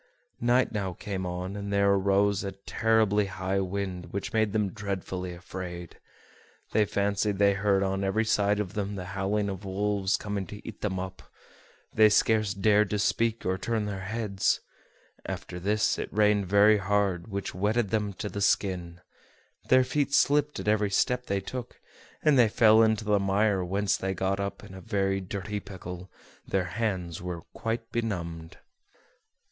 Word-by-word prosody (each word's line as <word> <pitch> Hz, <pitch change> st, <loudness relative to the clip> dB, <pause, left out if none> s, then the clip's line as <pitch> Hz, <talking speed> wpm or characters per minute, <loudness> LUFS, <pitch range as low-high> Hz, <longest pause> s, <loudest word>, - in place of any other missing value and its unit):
Night 120 Hz, +2 st, +2 dB
now 100 Hz, -4 st, -2 dB
came 95 Hz, 0 st, -4 dB
on, 90 Hz, +2 st, -4 dB
and 100 Hz, 0 st, -5 dB
there 100 Hz, 0 st, +3 dB
arose 100 Hz, 0 st, +2 dB
a 100 Hz, -1 st, -4 dB
terribly 105 Hz, +1 st, +1 dB
high 95 Hz, 0 st, -2 dB
wind, 95 Hz, -1 st, -3 dB
which 100 Hz, -, -4 dB
made 110 Hz, -2 st, +2 dB
them 105 Hz, -2 st, 0 dB
dreadfully 95 Hz, -3 st, -4 dB
afraid. 90 Hz, -1 st, -8 dB, 0.7 s
They 110 Hz, -, +3 dB
fancied 100 Hz, 0 st, 0 dB
they 100 Hz, 0 st, +4 dB
heard 100 Hz, 0 st, +2 dB
on 95 Hz, 0 st, -1 dB
every 110 Hz, +4 st, +1 dB
side 105 Hz, -1 st, +2 dB
of 105 Hz, -3 st, -3 dB
them 100 Hz, -1 st, -3 dB
the 95 Hz, -2 st, -5 dB
howling 100 Hz, +1 st, 0 dB
of 95 Hz, 0 st, -5 dB
wolves 100 Hz, 0 st, 0 dB
coming 100 Hz, -2 st, -4 dB
to 105 Hz, 0 st, -10 dB
eat 110 Hz, -, -8 dB
them 95 Hz, -3 st, -1 dB
up. 95 Hz, 0 st, -6 dB, 0.7 s
They 110 Hz, -1 st, +6 dB
scarce 110 Hz, -1 st, +2 dB
dared 105 Hz, +1 st, +3 dB
to 105 Hz, -, 0 dB
speak 115 Hz, +2 st, 0 dB
or 95 Hz, 0 st, 0 dB
turn 110 Hz, 0 st, -1 dB
their 100 Hz, -2 st, -4 dB
heads. 100 Hz, -1 st, 0 dB, 0.7 s
After 90 Hz, -, -5 dB
this, 105 Hz, +4 st, +1 dB
it -, -, -4 dB
rained 105 Hz, -2 st, +3 dB
very 105 Hz, +2 st, +5 dB
hard, 100 Hz, -3 st, 0 dB
which 100 Hz, -2 st, -4 dB
wetted 105 Hz, +2 st, 0 dB
them 105 Hz, -2 st, 0 dB
to 100 Hz, -, -5 dB
the 100 Hz, +1 st, -5 dB
skin; 90 Hz, -3 st, 0 dB, 0.7 s
their 130 Hz, 0 st, +6 dB
feet 140 Hz, +2 st, 0 dB
slipped 150 Hz, +1 st, +3 dB
at -, -, -6 dB
every 105 Hz, -1 st, +2 dB
step 125 Hz, +5 st, +1 dB
they 100 Hz, 0 st, 0 dB
took, 125 Hz, +4 st, -7 dB, 0.4 s
and 150 Hz, -4 st, +5 dB
they 115 Hz, -3 st, +6 dB
fell 110 Hz, 0 st, +6 dB
into 110 Hz, -1 st, +2 dB
the 105 Hz, -1 st, +3 dB
mire, 100 Hz, 0 st, +2 dB
whence 100 Hz, +3 st, 0 dB
they 95 Hz, 0 st, -2 dB
got 95 Hz, +2 st, -1 dB
up 100 Hz, +1 st, -4 dB
in 105 Hz, -2 st, -11 dB
a 95 Hz, -, -9 dB
very 95 Hz, -3 st, 0 dB
dirty 100 Hz, +2 st, -4 dB
pickle; 90 Hz, -2 st, -9 dB, 0.4 s
their 95 Hz, -2 st, 0 dB
hands 90 Hz, -4 st, -3 dB
were 90 Hz, -2 st, -5 dB
quite 115 Hz, 0 st, -3 dB
benumbed. 85 Hz, -8 st, -4 dB
100 Hz, 170 wpm, -28 LUFS, 95-105 Hz, 0.7 s, They